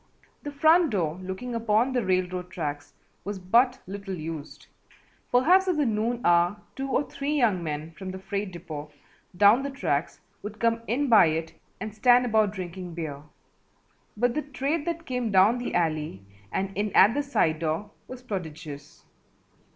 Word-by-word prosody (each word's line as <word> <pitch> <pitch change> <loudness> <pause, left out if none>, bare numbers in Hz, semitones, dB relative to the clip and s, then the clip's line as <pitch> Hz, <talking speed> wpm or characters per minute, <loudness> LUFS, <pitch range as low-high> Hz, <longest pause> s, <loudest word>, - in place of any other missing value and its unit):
The 290 - -6
front 320 +3 +4
door 175 -5 -1
looking 190 +7 -5
upon 230 +2 +1
the 245 -2 +1
railroad 185 -1 -1
tracks 145 -3 -5 0.3
was 205 0 -4
but 235 +8 +3
little 195 0 -6
used, 155 -2 -7 0.7
perhaps 355 +10 +5
at 360 -4 +1
the 295 - +2
noon 230 +2 -1
hour 175 +3 +4 0.2
two 270 0 -4
or 275 +2 0
three 285 +2 -3
young 215 -9 +2
men 155 0 -4
from 185 +3 -8
the 185 - -6
freight 200 +1 -4
depot 155 -4 -8 0.5
down 205 +6 +6
the 280 - -3
tracks 275 +1 -2 0.2
would 210 +1 -8
come 230 0 +1
in 275 +5 0
by 220 -8 +7
it 160 +1 -2 0.3
and 215 -1 -5
stand 245 +3 +4
about 220 -3 +2
drinking 180 -3 -7
beer, 150 -4 -5 1.0
but 245 +2 +2
the 305 - -1
trade 290 +2 -2
that 335 -1 -3
came 250 -4 -2
down 200 +6 +5
the 245 - -4
alley 155 - -1 0.3
and 195 0 -2
in 205 0 -1
at 205 +4 +7
the 290 - 0
side 165 - +1
door 165 +6 -2 0.2
was 255 -1 -9
prodigious. 155 - -7
205 Hz, 165 wpm, -26 LUFS, 175-250 Hz, 1.0 s, by